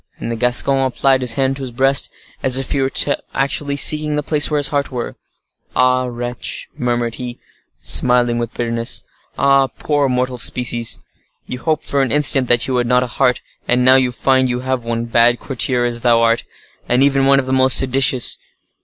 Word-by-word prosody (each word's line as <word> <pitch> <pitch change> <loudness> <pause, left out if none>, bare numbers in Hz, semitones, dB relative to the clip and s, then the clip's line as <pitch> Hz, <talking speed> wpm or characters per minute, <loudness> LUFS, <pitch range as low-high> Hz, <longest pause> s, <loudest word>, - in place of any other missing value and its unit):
And 115 - -6
the - - -3
Gascon 125 +3 0
applied 130 0 +1
his 125 -2 +1
hand 135 0 -1
to - - -8
his 130 - -5
breast, 135 +3 +2 0.3
as 130 -1 +3
if 135 -2 -4
he 140 - 0
were 135 - 0 0.5
actually 140 +1 -1
seeking 150 +1 +4
the 150 - -2
place 150 0 +2
where 150 - -1
his 145 -1 0
heart 140 -1 -2
was. 120 -2 -5 0.6
"Ah! 130 0 +2
wretch!" 120 0 -5
murmured 120 -1 -2
he, 120 -1 -6 0.4
smiling 120 -1 +2
with 120 -1 -4
bitterness. 115 -1 0 0.3
"Ah! 140 -1 +3
poor 145 +2 -2
mortal 125 0 -2
species! 120 -1 0 0.5
You 125 - -7
hoped, 155 0 -2
for 140 - -1
an 130 -4 -1
instant, 140 -3 +3
that 120 -1 +2
you 130 - -2
had 120 -1 -1
not 125 +1 +2
a - - -2
heart, 125 0 0 0.3
and 125 +1 +1
now 130 - +7
you 130 -1 +2
find 130 +1 +1
you 125 0 -3
have 130 -1 -3
one—bad 115 +1 +1
courtier 125 -2 -1
as 120 -1 -3
thou 120 -1 +3
art,—and 120 +2 -2
even 135 -1 +2
one 140 0 +4
of 135 - -3
the 130 - -3
most 130 0 +4
seditious. 130 -1 +2
130 Hz, 190 wpm, -17 LUFS, 120-135 Hz, 0.6 s, now